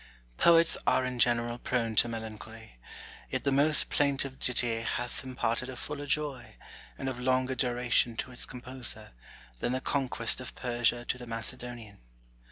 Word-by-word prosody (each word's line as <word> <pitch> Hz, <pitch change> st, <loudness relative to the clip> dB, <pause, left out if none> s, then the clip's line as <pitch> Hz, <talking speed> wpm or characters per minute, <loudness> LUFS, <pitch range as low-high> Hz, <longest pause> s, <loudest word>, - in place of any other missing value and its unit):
Poets 165 Hz, -1 st, +5 dB
are 130 Hz, -, +4 dB
in 125 Hz, -1 st, -4 dB
general 120 Hz, 0 st, +2 dB
prone 115 Hz, -3 st, -1 dB
to -, -, +7 dB
melancholy; 110 Hz, -, -8 dB, 0.5 s
yet -, -, -2 dB
the 140 Hz, -, +2 dB
most 145 Hz, +2 st, +5 dB
plaintive 135 Hz, -2 st, 0 dB
ditty 120 Hz, -2 st, +1 dB
hath 125 Hz, +4 st, -3 dB
imparted 125 Hz, -1 st, -2 dB
a 130 Hz, -, -6 dB
fuller 145 Hz, +3 st, -5 dB
joy, 140 Hz, -3 st, -2 dB, 0.4 s
and 135 Hz, -, -4 dB
of 130 Hz, -2 st, -3 dB
longer 130 Hz, +1 st, +1 dB
duration, 120 Hz, -2 st, +1 dB
to 130 Hz, -, -4 dB
its 125 Hz, -, 0 dB
composer, 125 Hz, 0 st, -5 dB, 0.5 s
than 120 Hz, -, -1 dB
the 130 Hz, -, 0 dB
conquest 130 Hz, -3 st, -1 dB
of 130 Hz, -, -7 dB
Persia 120 Hz, -1 st, 0 dB
to 125 Hz, -, -1 dB
the 125 Hz, -, -8 dB
Macedonian. 115 Hz, -1 st, -6 dB
125 Hz, 155 wpm, -30 LUFS, 120-130 Hz, 0.5 s, to